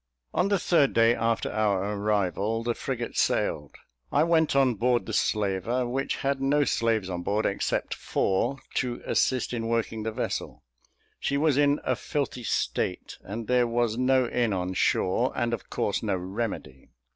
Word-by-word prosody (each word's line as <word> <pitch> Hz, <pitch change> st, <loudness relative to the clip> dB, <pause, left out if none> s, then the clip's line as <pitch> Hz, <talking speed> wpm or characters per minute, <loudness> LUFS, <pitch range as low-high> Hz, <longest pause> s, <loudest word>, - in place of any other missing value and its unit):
On 180 Hz, -, +2 dB
the 200 Hz, 0 st, +2 dB
third 160 Hz, -6 st, +3 dB
day 115 Hz, 0 st, +5 dB
after 115 Hz, -1 st, 0 dB
our 105 Hz, -1 st, 0 dB
arrival, 105 Hz, +1 st, 0 dB
the 120 Hz, 0 st, 0 dB
frigate 120 Hz, -1 st, -4 dB
sailed. 75 Hz, -1 st, 0 dB, 0.4 s
I 145 Hz, -, +4 dB
went 160 Hz, -3 st, +2 dB
on 135 Hz, -2 st, +4 dB
board 120 Hz, +3 st, +1 dB
the 110 Hz, -, -5 dB
slaver, 105 Hz, +4 st, 0 dB
which 135 Hz, +3 st, -1 dB
had 140 Hz, -1 st, 0 dB
no 145 Hz, +2 st, +3 dB
slaves 115 Hz, -7 st, +1 dB
on 90 Hz, -2 st, -4 dB
board 105 Hz, +4 st, 0 dB
except 100 Hz, -, -1 dB
four 95 Hz, +8 st, 0 dB, 0.2 s
to 125 Hz, -2 st, -2 dB
assist 130 Hz, -1 st, +1 dB
in 115 Hz, -1 st, -2 dB
working 115 Hz, -1 st, -1 dB
the 110 Hz, +1 st, -2 dB
vessel; -, -, -4 dB, 0.6 s
she 140 Hz, -, 0 dB
was 150 Hz, -1 st, +3 dB
in 145 Hz, +1 st, +3 dB
a -, -, +1 dB
filthy 140 Hz, -4 st, -3 dB
state, -, -, -2 dB
and 110 Hz, +4 st, -5 dB
there 125 Hz, +1 st, +3 dB
was 120 Hz, -1 st, 0 dB
no 130 Hz, 0 st, +2 dB
inn 120 Hz, -3 st, 0 dB
on 90 Hz, 0 st, -2 dB
shore, 95 Hz, +6 st, +1 dB
and 120 Hz, 0 st, 0 dB
of 120 Hz, -, -5 dB
course -, -, -1 dB
no -, -, 0 dB
remedy. 95 Hz, -, -5 dB
115 Hz, 170 wpm, -27 LUFS, 105-130 Hz, 0.6 s, day